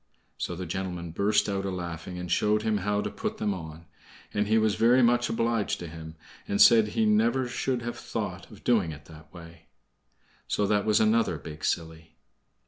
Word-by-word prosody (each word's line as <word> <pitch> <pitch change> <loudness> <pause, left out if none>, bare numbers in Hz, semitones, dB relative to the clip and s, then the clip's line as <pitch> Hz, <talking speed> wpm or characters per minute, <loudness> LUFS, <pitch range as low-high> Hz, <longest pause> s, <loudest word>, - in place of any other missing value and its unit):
So 90 - -3
the 90 +2 -5
gentleman 90 -1 -4
burst 100 +5 +2
out 100 -1 -2
a 100 - -2
laughing, 90 -1 -6
and 90 -1 -6
showed 105 +3 +2
him 110 -1 +1
how 105 +1 0
to - - -4
put - - -4
them 105 -1 -1
on; 80 -2 -9 0.5
and 105 0 0
he 110 +1 +3
was 110 -1 +2
very 120 +4 +4
much 120 0 +3
obliged 115 -2 0
to 90 - -7
him, 80 0 -9 0.3
and 100 - -1
said 115 -3 +7
he 110 +1 0
never 115 +5 +2
should 120 0 -2
have 120 0 -5
thought - - -5
of - - -15
doing 105 -9 +2
it 75 -1 -11
that 75 -1 -15
way. 85 -2 -13 0.8
So 105 - 0
that 105 0 +1
was 105 - +4
another 110 -6 +2
big 75 0 -10
silly. 80 0 -3
100 Hz, 195 wpm, -27 LUFS, 85-110 Hz, 0.8 s, said